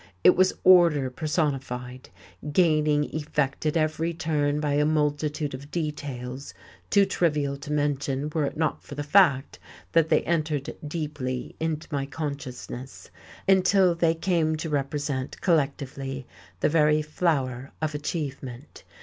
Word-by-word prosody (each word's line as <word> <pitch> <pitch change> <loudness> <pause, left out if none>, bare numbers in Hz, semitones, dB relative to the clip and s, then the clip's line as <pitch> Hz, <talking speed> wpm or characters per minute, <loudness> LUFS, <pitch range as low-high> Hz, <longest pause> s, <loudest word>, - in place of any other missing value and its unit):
It - - +7
was 185 +1 +4
order 170 -8 +6
personified, 130 -4 -2 0.4
gaining 150 -3 +3
effect 150 -1 -1
at 155 - +1
every 160 +1 0
turn 150 -2 0
by 150 -1 0
a 145 +1 +3
multitude 150 -1 0
of 140 +2 -8
details 140 -5 -5 0.3
too 200 -1 +5
trivial 150 -7 0
to 140 +2 -8
mention 145 -1 -1
were 155 -3 +1
it - - -4
not 160 -1 0
for 145 - -10
the 145 - -3
fact 145 -4 +3 0.3
that 165 -1 +3
they - - +3
entered 155 -4 -1
deeply 145 -5 -4
into 160 -1 -2
my 140 -2 -1
consciousness, 135 -4 -6 0.4
until 190 -1 +5
they 170 -1 +2
came 165 -2 +1
to 160 +1 -4
represent, 140 -2 -2
collectively, 140 -5 -1 0.4
the - - +3
very 150 -1 +3
flower 140 -5 -1
of 155 -1 -2
achievement. 140 -3 -5
150 Hz, 130 wpm, -26 LUFS, 140-160 Hz, 0.4 s, It